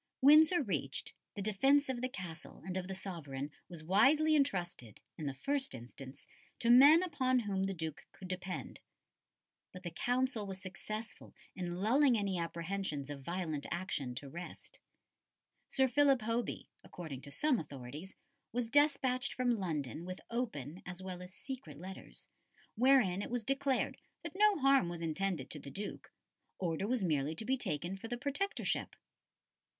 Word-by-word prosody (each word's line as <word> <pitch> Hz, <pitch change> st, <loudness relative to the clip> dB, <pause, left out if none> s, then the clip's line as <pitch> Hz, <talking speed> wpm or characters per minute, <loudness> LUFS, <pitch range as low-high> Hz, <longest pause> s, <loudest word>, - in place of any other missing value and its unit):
'" -, -, -58 dB
Windsor 310 Hz, +4 st, +7 dB
reached, 150 Hz, -, -2 dB, 0.2 s
the 200 Hz, -, -3 dB
defence 270 Hz, +8 st, +4 dB
of 255 Hz, -2 st, -2 dB
the 255 Hz, -, -1 dB
Castle 175 Hz, -8 st, -8 dB
and 185 Hz, -1 st, -4 dB
of 185 Hz, -1 st, -2 dB
the 190 Hz, -, -4 dB
sovereign 150 Hz, -7 st, -5 dB, 0.2 s
was 170 Hz, -3 st, -8 dB
wisely 275 Hz, -, +5 dB
entrusted, 175 Hz, -, 0 dB, 0.2 s
in 155 Hz, -, -4 dB
the 140 Hz, -, -2 dB
first 275 Hz, -, -1 dB
instance, 130 Hz, +2 st, -10 dB, 0.3 s
to 235 Hz, -, +3 dB
men 290 Hz, +8 st, +9 dB
upon 260 Hz, -7 st, +2 dB
whom 195 Hz, -3 st, -1 dB
the 195 Hz, -, -1 dB
Duke 160 Hz, -2 st, -5 dB
could 185 Hz, -, -10 dB
depend. 185 Hz, 0 st, -5 dB, 0.9 s
But 185 Hz, 0 st, -10 dB
the 175 Hz, -, -4 dB
Council 245 Hz, +2 st, 0 dB
was 190 Hz, -1 st, -6 dB
successful 215 Hz, +4 st, -7 dB, 0.2 s
in 175 Hz, -2 st, -3 dB
lulling 240 Hz, +7 st, +4 dB
any 195 Hz, -3 st, 0 dB
apprehensions 170 Hz, -4 st, -3 dB
of 140 Hz, -1 st, -6 dB
violent 160 Hz, -2 st, -3 dB
action 150 Hz, -8 st, -3 dB
to 140 Hz, -, -6 dB
rest. 170 Hz, +6 st, -9 dB, 0.9 s
Sir 265 Hz, -1 st, +3 dB
Philip 275 Hz, -1 st, +4 dB
Hoby, 230 Hz, 0 st, -2 dB, 0.2 s
according 155 Hz, -7 st, -7 dB
to 145 Hz, -, -8 dB
some 265 Hz, -, +2 dB
authorities, 145 Hz, +5 st, -8 dB, 0.4 s
was 235 Hz, 0 st, -1 dB
despatched 275 Hz, -3 st, +3 dB
from 250 Hz, -1 st, +1 dB
London 155 Hz, -, -3 dB
with 185 Hz, +1 st, -6 dB
open, 185 Hz, -, -3 dB
as 180 Hz, +1 st, -7 dB
well 185 Hz, -1 st, -6 dB
as 180 Hz, 0 st, -9 dB
secret, 255 Hz, -, -8 dB
letters, 190 Hz, +4 st, -8 dB, 0.5 s
wherein 235 Hz, -6 st, +4 dB
it -, -, -4 dB
was 245 Hz, -1 st, -1 dB
declared 275 Hz, +2 st, 0 dB, 0.3 s
that -, -, -6 dB
no 420 Hz, 0 st, +5 dB
harm 275 Hz, -, +4 dB
was 175 Hz, -1 st, -5 dB
intended 165 Hz, -3 st, -2 dB
to 150 Hz, -, -4 dB
the 140 Hz, -, -9 dB
Duke; 200 Hz, +9 st, -6 dB, 0.5 s
order 175 Hz, +1 st, -1 dB
was 245 Hz, -3 st, +1 dB
merely 155 Hz, -2 st, +1 dB
to 220 Hz, -, -4 dB
be 260 Hz, +3 st, +2 dB
taken 175 Hz, -, -2 dB
for 195 Hz, +4 st, -7 dB
the 240 Hz, +1 st, -3 dB
Protectorship. 285 Hz, +10 st, -1 dB
190 Hz, 160 wpm, -34 LUFS, 165-255 Hz, 0.9 s, men